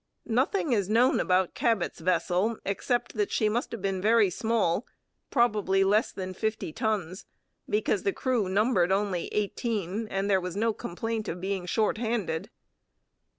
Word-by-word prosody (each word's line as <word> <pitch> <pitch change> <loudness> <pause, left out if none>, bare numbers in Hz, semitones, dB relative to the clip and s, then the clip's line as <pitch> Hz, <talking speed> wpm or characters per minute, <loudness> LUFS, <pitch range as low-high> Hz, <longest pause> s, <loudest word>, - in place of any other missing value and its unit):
Nothing 265 - +1
is 200 -4 0
known 235 +4 +4
about 185 0 +2
Cabot's 225 -7 0
vessel 180 +5 +1
except 240 +5 -1
that 210 -2 0
she 215 - +2
must 235 +3 -2
have 230 -4 -6
been 195 -1 -1
very 215 -2 +4
small, 220 -1 0 0.4
probably 210 -6 +2
less 210 +3 +2
than 185 -1 -5
fifty 215 -5 -3
tons, 200 -5 -2 0.4
because 420 - +1
the 395 - +1
crew 255 - 0
numbered 195 -2 +2
only 195 -3 0
eighteen 210 0 -2
and 195 -1 -2
there 190 -2 +3
was 180 0 -5
no 225 +2 +1
complaint 220 +4 -4
of 175 - -4
being 190 -1 -3
short 215 +2 +1
handed. 220 -8 -2
210 Hz, 150 wpm, -28 LUFS, 185-230 Hz, 0.4 s, known